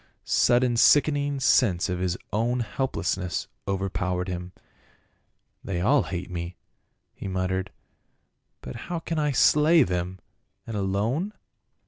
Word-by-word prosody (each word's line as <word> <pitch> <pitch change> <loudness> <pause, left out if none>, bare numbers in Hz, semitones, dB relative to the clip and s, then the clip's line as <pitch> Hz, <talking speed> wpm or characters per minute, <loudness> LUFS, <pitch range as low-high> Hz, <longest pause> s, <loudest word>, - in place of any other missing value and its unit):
199 120 0 +3
den 120 - -1
sickening 145 +1 +4
sense 115 -8 +3
of 90 -2 -2
his 90 -1 -1 0.2
own 120 +4 +1
helplessness 100 - -2 0.2
overpow 95 -2 -1
ered 90 +1 -3
him. 90 0 -5 0.6
" - - -46
They 95 -3 -3
all 130 +10 +4
hate 90 +1 -5
me," 85 0 -5 0.6
he - - -7
muttered, 95 0 -2 0.5
" - - -50
but 65 - -7
how 175 - -1
can 165 0 -3
I 150 -1 +1
slay 150 +4 +5
them, 90 -2 -3 0.5
and 115 - -6
alone 105 - -1
100 Hz, 135 wpm, -26 LUFS, 90-135 Hz, 0.6 s, slay